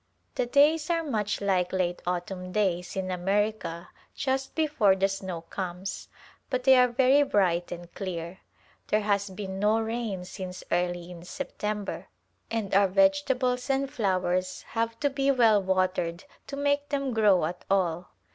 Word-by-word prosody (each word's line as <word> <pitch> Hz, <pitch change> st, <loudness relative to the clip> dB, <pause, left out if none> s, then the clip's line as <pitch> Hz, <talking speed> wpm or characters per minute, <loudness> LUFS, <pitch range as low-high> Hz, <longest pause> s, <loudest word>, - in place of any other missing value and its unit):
The 245 Hz, -, -1 dB
days 300 Hz, +4 st, +4 dB
are 335 Hz, -1 st, +1 dB
much 215 Hz, -10 st, -2 dB
like 185 Hz, -3 st, +1 dB
late 180 Hz, -2 st, -1 dB
autumn 180 Hz, +1 st, -3 dB
days 180 Hz, -3 st, 0 dB
in 190 Hz, -1 st, -2 dB
America 195 Hz, -1 st, -1 dB, 0.3 s
just 265 Hz, 0 st, -2 dB
before 290 Hz, -11 st, +3 dB
the 195 Hz, 0 st, +2 dB
snow 190 Hz, -3 st, -5 dB
comes, 185 Hz, +2 st, -5 dB, 0.4 s
but 255 Hz, -1 st, -1 dB
they 265 Hz, 0 st, +7 dB
are 250 Hz, 0 st, +6 dB
very 260 Hz, +3 st, +4 dB
bright 180 Hz, -10 st, +1 dB
and 175 Hz, 0 st, -8 dB
clear. 180 Hz, -2 st, -5 dB, 0.5 s
There 215 Hz, -, +2 dB
has 200 Hz, -1 st, 0 dB
been 190 Hz, 0 st, -6 dB
no 210 Hz, +2 st, +3 dB
rain 225 Hz, -5 st, -3 dB
since 185 Hz, 0 st, -7 dB
early 175 Hz, 0 st, -1 dB
in 170 Hz, -1 st, -10 dB
September 210 Hz, -2 st, -4 dB, 0.4 s
and 220 Hz, -4 st, -2 dB
our 195 Hz, +1 st, +5 dB
vegetables 260 Hz, +1 st, +2 dB
and 270 Hz, 0 st, +1 dB
flowers 185 Hz, -3 st, 0 dB
have 230 Hz, 0 st, -2 dB
to 285 Hz, -, +3 dB
be 275 Hz, 0 st, 0 dB
well 230 Hz, -6 st, +5 dB
watered 185 Hz, -2 st, 0 dB, 0.2 s
to 280 Hz, -, -5 dB
make 285 Hz, 0 st, 0 dB
them 275 Hz, -3 st, -1 dB
grow 205 Hz, -7 st, +4 dB
at 175 Hz, +3 st, -5 dB
all. 180 Hz, -3 st, +1 dB
200 Hz, 155 wpm, -27 LUFS, 180-250 Hz, 0.5 s, they